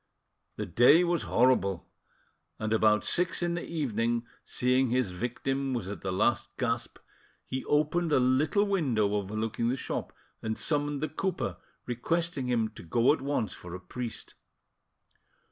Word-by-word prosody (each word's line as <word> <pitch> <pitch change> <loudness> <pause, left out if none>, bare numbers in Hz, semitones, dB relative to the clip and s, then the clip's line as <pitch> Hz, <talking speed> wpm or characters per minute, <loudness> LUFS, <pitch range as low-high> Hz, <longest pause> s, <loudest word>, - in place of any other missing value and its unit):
The - - -3
day 145 +9 +6
was 175 -2 +1
horrible, 115 -7 +2 0.7
and 110 0 -2
about 110 -1 +4
six 175 0 +1
in 175 0 0
the 170 - -3
evening, 120 -6 -1 0.2
seeing 125 +1 +1
his 125 -5 +1
victim 130 +6 -2
was 115 -6 -3
at 100 - -6
the 95 - -2
last 105 +6 +1
gasp, 120 -2 -2 0.5
he 130 0 -4
opened 155 +3 +1
a 145 - +5
little 135 +11 +3
window 130 - +1
overlooking 110 +3 -1
the 125 - +1
shop - - -4 0.3
and 110 0 -3
summoned 145 -1 +1
the - - +1
cooper, 185 +3 -2 0.3
requesting 150 +3 -1
him 115 -3 +1
to 110 - -12
go 115 - +3
at 155 - -4
once 135 -7 -1
for 90 0 -9
a - - -6
priest. 115 +5 -6
125 Hz, 150 wpm, -29 LUFS, 110-150 Hz, 0.7 s, day